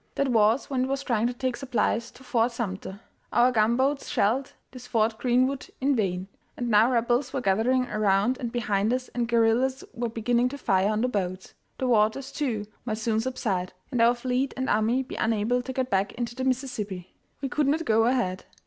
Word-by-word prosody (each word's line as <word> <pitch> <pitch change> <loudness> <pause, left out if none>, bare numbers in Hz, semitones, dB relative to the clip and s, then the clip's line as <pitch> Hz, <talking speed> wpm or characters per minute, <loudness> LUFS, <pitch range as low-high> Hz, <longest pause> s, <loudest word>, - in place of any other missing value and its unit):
That 275 - +1
was 225 +1 +3
when 255 -2 0
it - - -4
was 275 +1 -2
trying 235 -4 +1
to 245 - -2
take 255 0 -2
supplies 235 -3 -1
to 260 - -17
Fort 240 -1 +1
Sumter. 200 -3 -5 0.3
Our 245 +1 +4
gunboats 250 +5 +1
shelled 250 +7 +1 0.2
this 250 -1 -11
"Fort 220 -2 +1
Greenwood" 255 +2 +1
in 275 +1 +2
vain, 190 -4 -1 0.3
and 240 -1 -2
now 215 +2 +5
Rebels 245 +2 +1
were 270 - 0
gathering 240 +5 +2
around 210 +3 +1
and 240 -2 -3
behind 215 -3 0
us 255 0 -3
and 240 -1 -2
guerrillas 235 +3 +2
were 235 0 -2
beginning 240 +2 +1
to 280 - -7
fire 195 -6 +2
on 215 0 0
the 250 - +2
boats. 185 -5 -3 0.2
The 260 - -2
waters, 230 +3 +2
too, 230 -8 -2 0.2
might 220 -3 -3
soon 220 0 0
subside, 220 -7 -2 0.2
and 245 -3 +1
our 235 +1 +5
fleet 255 +2 -1
and 260 0 -1
army 225 +5 +2
be 255 - -8
unable 225 +3 +1
to 260 - -6
get 260 0 -2
back 195 0 +1
into 240 -1 -4
the 260 +1 -4
Mississippi. 225 -9 -3 0.3
We 275 - -2
could 295 +2 0
not 315 +4 +1
go 225 0 +3
ahead. 235 -7 0
240 Hz, 200 wpm, -26 LUFS, 215-255 Hz, 0.3 s, now